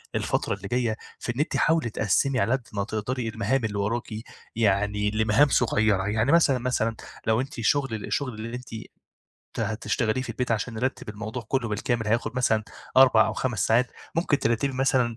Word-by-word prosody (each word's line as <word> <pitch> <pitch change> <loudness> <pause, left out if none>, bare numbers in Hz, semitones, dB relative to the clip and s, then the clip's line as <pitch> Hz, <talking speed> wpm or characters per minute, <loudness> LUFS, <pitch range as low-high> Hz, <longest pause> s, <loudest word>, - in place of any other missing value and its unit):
الفترة - - 0
اللي - - -6
جاية 120 -3 0 0.2
في 120 - -4
إن - - -5
أنتِ 150 - 0
حاولي 160 -7 +2
تقسّمي 125 +5 +1
على 100 +2 +1
قد 130 -2 -1
ما 100 - -1
تقدري 115 +3 -3
المهام 115 +3 0
اللي 105 -2 -3
وراكِ، 105 +4 -1 0.5
يعني 105 -1 +1
لمهام 110 +6 +4
صغيرة، 110 -6 +2
يعني 110 +6 +1
مثلًا، 160 -6 +5
مثلًا 115 -2 0 0.3
لو 110 +2 +3
أنتِ 135 +2 -6
شغل، 135 +2 +1
الشغل 135 -3 -2
اللي 115 +3 -6
أنتِ 125 0 -8 0.9
ت - - -2
هتشتغليه 110 +2 -1
في - - -8
البيت 125 -1 -3
عشان 115 +2 -2
نرتِّب 130 +2 -3
الموضوع 110 +3 -5
كلّه 130 -4 0
بالكامل 115 +1 -1
هياخد 120 +3 0
مثلًا 110 -3 +2 0.3
4 125 -5 +7
أو - - -1
5 120 -7 -1
ساعات 120 +3 +3 0.2
ممكن 165 -4 +1
ترتّبي 115 +4 0
مثلًا 130 -3 +1
115 Hz, 180 wpm, -26 LUFS, 110-130 Hz, 0.9 s, 4